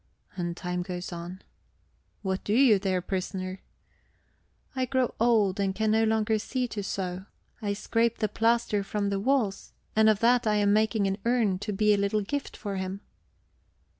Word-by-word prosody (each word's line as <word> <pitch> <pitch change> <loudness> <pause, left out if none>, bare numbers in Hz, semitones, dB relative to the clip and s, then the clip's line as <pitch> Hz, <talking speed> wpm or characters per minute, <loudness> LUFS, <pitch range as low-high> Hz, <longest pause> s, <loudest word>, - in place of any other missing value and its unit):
And 175 -1 -3
time 180 0 -3
goes 180 0 -5
on... 175 +3 -7 0.8
"What 190 -1 -2
do 205 - -1
you 240 -6 +6
there, 185 -2 -1
prisoner?" 185 0 -4 1.1
"I 260 -1 0
grow 255 -1 0
old, 215 -4 +3
and 195 -1 0
can 215 +1 +1
no 220 +1 +3
longer 220 0 +1
see 250 +3 -2
to 210 - -4
sew; 190 0 -4 0.3
I 205 -2 -1
scrape 230 +3 0
the 215 - 0
plaster 225 -1 +1
from 200 0 -2
the 200 - 0
walls. 230 -3 0 0.2
And 220 0 +5
of 215 -2 +3
that 240 0 +4
I 210 - +3
am 205 -1 +3
making 215 -1 +2
an 195 +1 -1
urn 230 -6 +1
to 205 +1 -4
be 210 +1 +3
a - - +2
little 200 +1 +1
gift 285 +8 -4
for 200 -2 -4
him." 190 +1 -4
205 Hz, 175 wpm, -28 LUFS, 190-225 Hz, 1.1 s, you